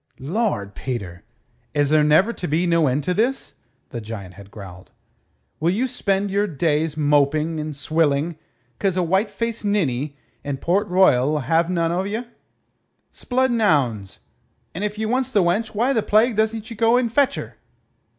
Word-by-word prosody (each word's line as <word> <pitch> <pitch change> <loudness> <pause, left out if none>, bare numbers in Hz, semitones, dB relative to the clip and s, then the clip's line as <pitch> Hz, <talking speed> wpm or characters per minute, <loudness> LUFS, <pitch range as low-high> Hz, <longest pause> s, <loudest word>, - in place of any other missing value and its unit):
"Lord, 145 - -2
Peter! 100 -10 -5 0.5
Is 145 -1 +2
there 155 -1 +5
never 155 +10 +4
to 180 - -5
be 160 +4 +1
no 170 -3 +3
end 135 +3 0
to 180 - 0
this?" 215 - -1 0.3
the 120 - -6
giant 105 -4 -8
had 100 +1 -13
growled. 95 -3 -11 0.7
"Will 165 - +1
you 225 +8 +1
spend 200 -4 -1
your 205 +1 +1
days 155 -1 0
moping 150 +2 +2
and 155 -1 -5
swilling 155 +1 0 0.4
'cause 190 -2 0
a 180 - +2
white 190 +5 +1
faced 230 +2 -4
ninny 145 -9 -1 0.3
in 140 -1 -3
Port 195 +8 0
Royal'll 150 -6 +3
have 165 +6 +1
none 170 -2 0
o' 175 +2 0
ye? 210 +5 -3 0.9
'Sblood 260 +1 0
and 235 -1 0
'ounds! 125 - +1 0.5
If 210 +4 -3
ye 220 - -2
wants 255 +3 0
the 210 -7 +2
wench, 205 +6 0
why 245 +6 +2
the 225 - +2
plague 220 +3 +3
doesn't 220 +1 -1
ye - - -6
go 230 +2 +3
and 235 -3 0
fetch 280 0 +3
her?" - - -7
170 Hz, 170 wpm, -22 LUFS, 145-215 Hz, 0.9 s, there